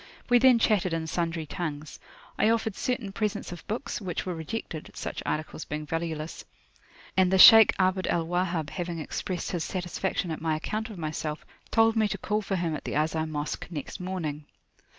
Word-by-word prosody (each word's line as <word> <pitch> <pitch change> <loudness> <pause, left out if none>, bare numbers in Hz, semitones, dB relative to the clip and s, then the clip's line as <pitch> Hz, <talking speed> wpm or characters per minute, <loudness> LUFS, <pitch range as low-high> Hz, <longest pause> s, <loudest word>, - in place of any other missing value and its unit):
We 245 - +7
then 255 -1 +6
chatted 200 -6 +2
in 165 -1 -2
sundry 165 0 -2
tongues. 155 -2 -5 0.4
I 215 - +3
offered 225 -2 +1
certain 250 -5 -2
presents 210 -2 -2
of 175 - -9
books, 225 +2 -3
which 180 -4 -3
were 180 - -2
rejected 160 0 -5
(such - - -5
articles 155 +1 -3
being 150 +1 -5
valueless), 165 0 -4 0.7
and 185 -1 +4
the 190 - +4
Shaykh 220 +3 +10
Abd 185 0 +1
al 165 -1 +1
Wahhab 175 -2 -1
having 175 -2 -4
expressed 170 +3 -4
his 175 -4 -1
satisfaction 180 -1 -2
at 160 - -4
my 160 -1 +1
account 215 +8 -3
of 210 - -8
myself, 155 -1 -4 0.2
told 225 0 +4
me 220 -1 +3
to - - -3
call 210 0 -1
for 195 -1 -2
him 170 -3 -1
at - - -6
the - - -4
Azhar 160 +1 0
Mosque 150 -1 -4
next 160 +2 -6
Morning. 165 -5 -4
175 Hz, 185 wpm, -28 LUFS, 160-200 Hz, 0.7 s, Shaykh